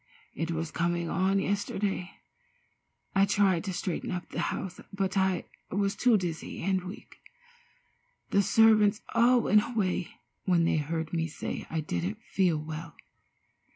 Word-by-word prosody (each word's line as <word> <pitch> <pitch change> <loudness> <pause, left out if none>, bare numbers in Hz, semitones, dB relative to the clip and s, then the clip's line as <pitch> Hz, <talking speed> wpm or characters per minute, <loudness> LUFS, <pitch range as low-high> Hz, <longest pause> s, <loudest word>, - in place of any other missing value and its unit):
It 165 +2 -3
was 165 -1 -2
coming 170 0 -1
on 190 +1 +2
yesterday. 195 -1 -1 1.0
I 195 0 +4
tried 195 -4 +3
to 195 - -2
straighten 180 -1 -3
up 180 -1 -4
the - - -5
house, 185 -1 -5
but 195 -1 -1
I 190 -1 +1 0.2
was 200 +1 0
too 240 -1 +4
dizzy 170 -4 -4
and 190 0 +1
weak. 185 - -10 1.1
The 200 - +4
servants 215 0 +4
all 240 +1 +5
went 210 -1 +5
away 195 -7 -1 0.4
when 175 -3 +3
they 165 - +2
heard 160 +2 -2
me 165 -1 0
say 155 - -5
I 160 0 -1
didn't 90 - -3
feel 180 -5 +1
well. 155 +1 -6
185 Hz, 145 wpm, -29 LUFS, 165-200 Hz, 1.1 s, all